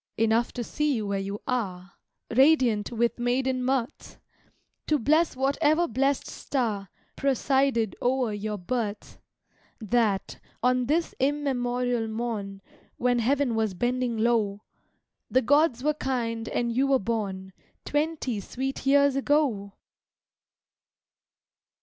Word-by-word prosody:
Enough 225 +1 +2
to 240 - -3
see 300 +4 0
you 220 -3 -2
where 200 -1 -1
you 200 +1 -5
are, 195 -7 -3 0.4
Radiant 255 -7 +4
with 235 +1 0
maiden 255 +1 0
mirth! 260 +1 -2 0.7
To 305 - +3
bless 310 +6 +2
whatever 295 +5 +2
blessed 270 +4 0
star 215 -8 -3 0.3
Presided 265 -5 +1
o'er 250 -3 +1
your 210 +1 -3
birth, 210 +2 -4 0.6
That, 215 -3 0 0.2
on 250 0 +2
this 325 +4 0
immemorial 250 -4 0
morn, 220 -4 -4 0.3
When 245 0 +2
heaven 265 +1 +1
was 220 -4 0
bending 245 +2 -1
low, 215 -3 +1 0.7
The 260 - +2
gods 285 -1 +3
were 300 +1 +2
kind 230 -5 -2
and 235 -1 -1
you 270 +2 +2
were 275 -1 +4
born 195 -4 -3 0.3
Twenty 295 -6 -1
sweet 265 +7 -4
years 280 0 +4
ago! 270 -8 +1
245 Hz, 115 wpm, -26 LUFS, 220-270 Hz, 0.7 s, Radiant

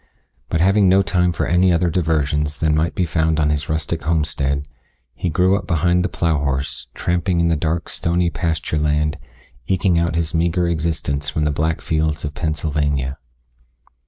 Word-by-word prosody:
But 80 - 0
having 100 +1 +4
no 95 +1 +5
time 90 -2 +1
for - - -2
any 90 +1 +3
other 85 0 +2
diversions 75 -3 0
than 80 -1 +2
might 80 +2 0
be 95 -4 +1
found 80 -1 +1
on 75 -1 +2
his 75 -2 -2
rustic 80 +1 -2
homestead, 75 -3 -1 0.5
he 90 - -3
grew 90 +4 +3
up 100 -2 -4
behind 85 +1 +2
the 90 - -1
plow 80 -4 0
horse, 70 0 -3
tramping 85 0 0
in 85 0 +2
the 85 - +2
dark, 80 +2 -1
stony 85 0 0
pasture 80 -3 -2
land, 75 0 0 0.5
eking 95 -2 +2
out 85 -1 0
his 80 -1 -1
meager 85 +1 +1
existence 80 -3 -2
from 75 +1 -1
the 75 - +1
black 80 +2 -1
fields 80 -1 -1
of 75 - -5
Pennsylvania. 75 -4 -1
80 Hz, 175 wpm, -20 LUFS, 75-85 Hz, 0.5 s, no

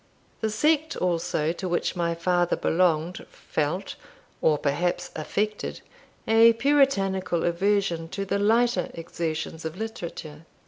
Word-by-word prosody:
The 220 - 0
sect 310 +7 +1
also 165 -3 0
to 180 +2 -4
which 175 +2 -1
my 170 -1 0
father 175 +1 +1
belonged, 170 0 +1
felt, 160 +6 -3 0.5
or 155 -1 +3
perhaps 150 +5 -1
affected, 210 +7 -2 0.5
a 225 +1 +7
puritanical 200 - +2
aversion 175 -2 0
to 195 +3 -4
the 200 +1 -1
lighter 235 +4 +2
exertions 165 -1 -4
of 160 +2 -5
literature. 170 -8 -7
180 Hz, 120 wpm, -26 LUFS, 165-210 Hz, 0.5 s, a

